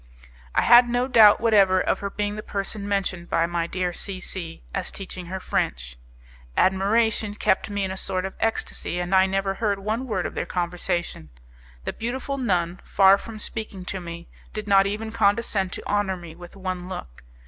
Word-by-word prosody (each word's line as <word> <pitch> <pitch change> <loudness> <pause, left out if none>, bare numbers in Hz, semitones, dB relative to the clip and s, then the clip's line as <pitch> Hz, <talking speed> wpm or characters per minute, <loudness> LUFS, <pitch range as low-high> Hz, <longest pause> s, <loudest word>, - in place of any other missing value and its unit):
I - - +4
had 240 0 +7
no 245 +1 +1
doubt 220 -5 +7
whatever 200 -5 +4
of - - 0
her 200 - -3
being 205 +1 -2
the 215 - -5
person 200 0 -4
mentioned 190 -3 -2
by 165 0 +2
my 170 -1 -1
dear 180 0 -2
C 190 +1 -6
C 170 -3 -6
as 195 -2 -3
teaching 185 -2 -7
her 190 +2 -4
French. - - -2 0.6
Admiration 205 +2 +2
kept 205 - +1
me 205 -1 -2
in 190 - -2
a 190 - -5
sort 185 -1 -1
of 190 - -5
ecstacy, 225 -5 -2
and 175 +1 -2
I 190 0 +6
never 195 0 0
heard 200 0 0
one 220 +6 -2
word 190 -6 -1
of - - -4
their - - -3
conversation; 175 - -2 0.5
the - - -3
beautiful 260 +4 -3
nun, 180 -6 0
far 195 0 +5
from 225 +1 -9
speaking 210 -3 -5
to 190 - -3
me, 170 0 -8 0.3
did 215 -1 -5
not 195 -1 +5
even 215 +2 -3
condescend 205 -3 +1
to - - -6
honour 205 -2 0
me 170 -2 -10
with 175 +2 -12
one 185 -2 -4
look. 65 - -8
195 Hz, 190 wpm, -24 LUFS, 180-210 Hz, 0.6 s, had